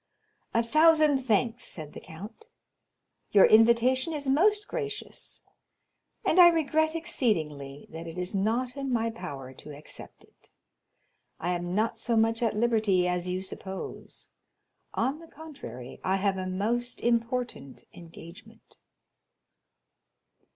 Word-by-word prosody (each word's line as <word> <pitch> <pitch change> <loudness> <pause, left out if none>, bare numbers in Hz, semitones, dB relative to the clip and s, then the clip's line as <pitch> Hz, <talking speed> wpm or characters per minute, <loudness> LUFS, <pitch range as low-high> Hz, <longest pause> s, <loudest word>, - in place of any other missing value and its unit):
"A 230 - +4
thousand 310 +2 +5
thanks," 240 -1 0
said 155 -3 -6
the - - -8
count, 205 - -11 0.8
"your 200 - +7
invitation 235 +6 +4
is 290 -2 -4
most 410 +10 +3
gracious, 425 -3 -5 0.8
and - - +3
I 350 - +11
regret 315 -1 +2
exceedingly 155 - -1
that 165 +1 -7
it 165 +1 -8
is 180 +2 -2
not 230 +6 0
in 275 -2 -3
my 230 -1 +1
power 140 - -8
to 145 +2 -11
accept 150 - -10
it. - - -20 0.9
I 175 - -1
am 175 0 -2
not 225 +2 0
so 230 0 +1
much 225 +1 +2
at 230 -2 +1
liberty 215 -5 +2
as 180 0 -1
you 185 +1 -2
suppose; 190 0 -7 0.7
on 275 +4 0
the 330 - -13
contrary, 270 - -10
I 190 - +1
have 195 0 +1
a 185 - -3
most 230 +6 -1
important 235 - -1
engagement." 170 0 -14
225 Hz, 130 wpm, -28 LUFS, 180-270 Hz, 0.9 s, I